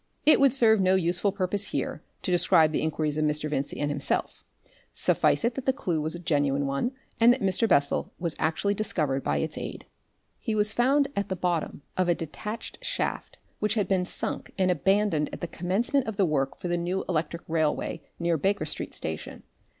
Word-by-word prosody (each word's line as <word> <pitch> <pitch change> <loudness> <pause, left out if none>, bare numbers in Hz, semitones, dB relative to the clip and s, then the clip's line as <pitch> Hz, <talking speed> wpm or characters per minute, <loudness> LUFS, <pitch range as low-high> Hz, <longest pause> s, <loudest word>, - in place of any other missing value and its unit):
It 305 - +7
would 275 -1 +5
serve 225 -5 +5
no 185 0 +4
useful 180 +2 +1
purpose 200 +1 -1
here 155 - -3 0.2
to - - -1
describe 170 -3 +4
the - - 0
inquiries 155 -1 -1
of - - +1
Mr. 150 0 0
Vincey 145 -2 -3
and 145 0 0
himself; 145 -1 -2 0.5
suffice - - +2
it 235 - +1
that 270 +2 -6
the 265 - +4
clue 175 - -2
was 155 +2 -3
a - - -6
genuine 145 -4 +1
one, 140 - -1 0.3
and 230 +1 +7
that 250 - +1
Mr. 195 +2 +1
Bessel 140 -4 +2
was 170 -3 -1
actually 165 +6 +1
discovered 155 -10 -1
by 70 - 0
its 70 - -2
aid. - - -6 0.5
He 220 - -2
was 210 0 +6
found 275 +3 +3
at 200 0 -2
the 190 - -1
bottom 175 -5 -2
of 185 -1 +2
a 175 - +4
detached 210 +8 -6
shaft - - -3 0.2
which 210 +1 +1
had 210 -3 +1
been 185 -2 +1
sunk - - -4
and 185 -2 +3
abandoned 190 -2 +2
at - - -8
the - - -1
commencement 210 - 0
of 220 - -3
the 195 - +4
work 135 -4 -1
for - - -5
the 175 0 0
new 175 +2 -2
electric 165 -1 -2
railway 160 -2 0 0.2
near 170 -1 +1
Baker 195 +7 +1
Street - - -3
Station. - - -5
180 Hz, 200 wpm, -27 LUFS, 155-210 Hz, 0.5 s, It